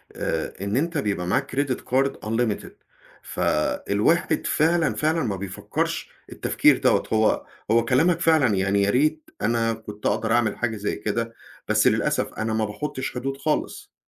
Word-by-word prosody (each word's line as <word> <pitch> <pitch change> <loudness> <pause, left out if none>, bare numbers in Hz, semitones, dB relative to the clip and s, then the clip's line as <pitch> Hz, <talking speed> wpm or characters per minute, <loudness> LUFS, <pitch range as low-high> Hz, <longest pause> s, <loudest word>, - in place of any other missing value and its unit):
آآ - - -2
إن 100 +4 -1
أنت 165 +3 0
بيبقى 100 -9 -1
معاك 130 +6 -1
credit 135 -2 0
card 135 +2 +1
unlimited 115 -1 -1 0.5
فالواحد 75 - 0
فعلًا، 165 0 +2
فعلًا 160 +1 +1
ما 105 -5 -1
بيفكّرش 95 0 -3 0.2
التفكير - - +3
دَوَّة - - +2
هو 110 0 +2 0.3
هو 115 0 +4
كلامك 160 +8 +3
فعلًا، 155 - +3
يعني 100 +1 +1
يا 100 - +2
ريت 155 +7 +1
أنا 115 0 +1
كنت 105 -1 -10
أقدَر 110 +2 0
أعمل 115 -3 +1
حاجة 115 -2 -1
زي 105 0 -2
كده، 115 +2 -3 0.3
بس - - +3
للأسف - - +1
أنا 110 0 -2
ما 110 0 +1
باحُطّش 130 +5 -4
حدود 135 +2 -3
خالص. 150 +2 -2
115 Hz, 155 wpm, -24 LUFS, 105-140 Hz, 0.5 s, هو